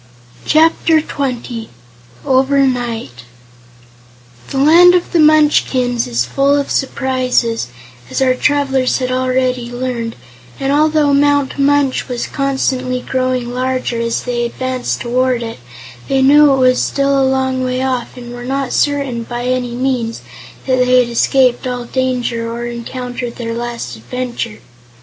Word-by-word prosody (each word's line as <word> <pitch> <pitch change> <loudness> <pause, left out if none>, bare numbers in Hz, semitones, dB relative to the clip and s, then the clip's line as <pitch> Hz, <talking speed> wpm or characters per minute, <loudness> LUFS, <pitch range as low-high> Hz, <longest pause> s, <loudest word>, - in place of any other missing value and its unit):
Chapter 320 +1 +4
Twenty 250 -6 -4 0.6
Over 270 +1 +3
Night 230 - -3 1.3
The - - -4
Land 340 +6 +6
of 355 - -1
the 340 - +2
Munchkins 295 -6 +3
is 120 0 0
full 275 - +2
of 280 - -2
surprises, 255 - 0 0.4
as - - -2
our 260 -1 +3
travelers 270 -1 +1
had 255 -1 -2
already 255 -1 0
learned, 245 -2 -4 0.4
and 270 +1 0
although 305 -1 +3
Mount 285 0 +2
Munch 280 -1 +2
was 245 -2 -3
constantly 260 -2 -1
growing 255 -2 -2
larger 255 -2 -2
as 230 0 -2
they 240 -1 -2
advanced 255 +1 -3
toward 250 0 0
it, 225 - -7 0.5
they 270 -1 +2
knew 290 +2 +6
it 270 - +2
was 255 -1 +3
still 275 0 +1
a 265 - +2
long 260 -1 0
way 255 0 -1
off 255 -1 -3
and 240 -1 -9
were 245 0 -8
not 270 0 -2
certain, 280 -5 0
by 240 +1 -5
any 250 -1 -1
means, 245 -3 -2 0.4
that 255 -1 +1
they 250 0 +4
had 245 -1 +1
escaped 250 +1 +2
all 245 -1 -4
danger 245 -2 -2
or 235 +1 -5
encountered 245 0 -5
their 230 -1 -4
last 235 - -5
adventure. 235 - -5
255 Hz, 140 wpm, -16 LUFS, 240-275 Hz, 1.3 s, Land